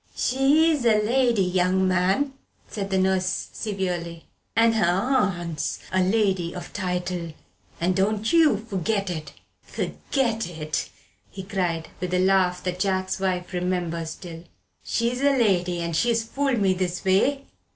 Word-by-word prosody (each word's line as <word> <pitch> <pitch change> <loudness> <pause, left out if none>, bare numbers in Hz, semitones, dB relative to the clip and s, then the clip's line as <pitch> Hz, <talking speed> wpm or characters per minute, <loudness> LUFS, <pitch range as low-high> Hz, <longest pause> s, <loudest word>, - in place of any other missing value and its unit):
"She's 285 +3 +3
a 220 -3 +4
lady, 235 -1 +2
young 185 +1 +2
man," 190 +10 +1 0.3
said 200 -2 -5
the 190 - +1
nurse 185 -1 0
severely; 180 -5 -3 0.3
"and 225 +1 +4
her 220 -1 +1
aunt's 180 - 0
a 185 - +2
lady 190 -3 +1
of 175 -1 -8
title, 180 -3 -3 0.5
and 180 +2 +1
don't 210 - 0
you 315 -9 +5
forget 200 -2 -2
it!" 155 -3 -6 0.3
"Forget 230 -7 -2
it," 155 -3 -3 0.4
he 190 - -8
cried, 180 -5 -2
with 180 0 -2
a - - +2
laugh 185 -1 +2
that 180 0 -3
Jack's 185 -1 0
wife 185 -1 -2
remembers 175 -2 -2
still; 165 -2 -9 0.4
"she's 235 +2 -1
a 280 -1 +3
lady, 180 -6 +1
and 170 -1 -2
she's 230 +5 +2
fooled 270 +2 -1
me 195 -2 +3
this 180 -1 -3
way? 255 +9 +2
190 Hz, 140 wpm, -24 LUFS, 180-225 Hz, 0.5 s, you